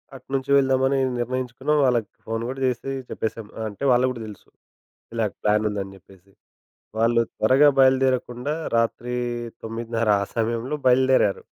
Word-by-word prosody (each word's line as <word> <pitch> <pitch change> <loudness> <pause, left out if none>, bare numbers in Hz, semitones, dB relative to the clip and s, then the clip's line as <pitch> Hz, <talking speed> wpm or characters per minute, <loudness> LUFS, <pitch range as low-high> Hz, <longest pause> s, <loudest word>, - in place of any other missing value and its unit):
అటు 130 -1 -14
నుంచి 135 0 -3
వెళ్దామని 135 0 +2 0.2
నిర్ణయించుకున్నాం 130 +4 -1
వాళ్ళకి 120 -4 +1 0.2
ఫోన్ 115 +1 -2
కూడా 135 - -5
చేసి 130 +1 -2 0.2
చెప్పేసాం 110 -1 -4
ఆహ్, 110 - -3
అంటే 105 +6 -10
వాళ్ళకి 125 +1 +3
కూడా 120 -3 -7
తెలుసు. 105 -2 -12 0.7
ఇలాగ 110 -3 0
ప్లాన్ 105 0 +2
ఉందని 100 -1 -5
చెప్పేసి. 95 0 -21 0.7
వాళ్ళు 115 +1 +3 0.2
త్వరగా 135 +7 +5
బయలుదేరకుండా 130 0 +2 0.2
రాత్రి 120 +1 -1 0.5
9:30 115 0 -2
ఆ - - 0
సమయంలో 115 +4 -1
బయలుదేరారు. 130 -5 +3
120 Hz, 135 wpm, -23 LUFS, 110-130 Hz, 0.7 s, త్వరగా